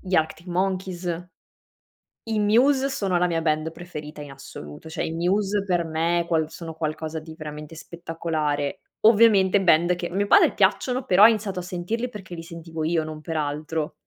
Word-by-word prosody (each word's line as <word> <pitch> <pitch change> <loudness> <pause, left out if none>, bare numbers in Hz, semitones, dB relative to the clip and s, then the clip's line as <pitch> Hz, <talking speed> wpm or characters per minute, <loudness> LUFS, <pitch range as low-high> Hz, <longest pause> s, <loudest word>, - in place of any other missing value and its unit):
gli 185 -1 -3
Active 160 +2 0
Monkeys. 180 -1 -2 1.0
I 220 -1 -1
Muse 260 +6 +3
sono 195 -8 0
la 180 +1 +2
mia 165 -1 -1
band 155 0 0
preferita 155 -3 -9
in 145 -1 -9
assoluto, 135 - -10
cioè - - -3
i - - -3
Muse 195 +4 0
per 175 -3 0
me 165 +2 0
quals 160 -2 0
sono 165 -2 -7
qualcosa 155 0 -3
di 160 0 -11
veramente 150 0 -8
spettacolare. 160 -4 -3 0.2
Ovviamente 205 -3 +5
band 175 0 +4
che 175 0 -4
a 175 - -10
mio 200 +1 +1
padre - - +6
piacciono, 255 0 +1
però 190 +2 +5
ha 220 - +11
iniziato 210 -4 -1
a - - -3
sentirli 180 +8 -3
perché 190 -6 -9
li 165 - -7
sentivo 165 -1 -7
io, 160 0 +1
non 155 0 -7
per 160 +1 -4
altro. 150 +2 -2
170 Hz, 180 wpm, -24 LUFS, 160-190 Hz, 1.0 s, ha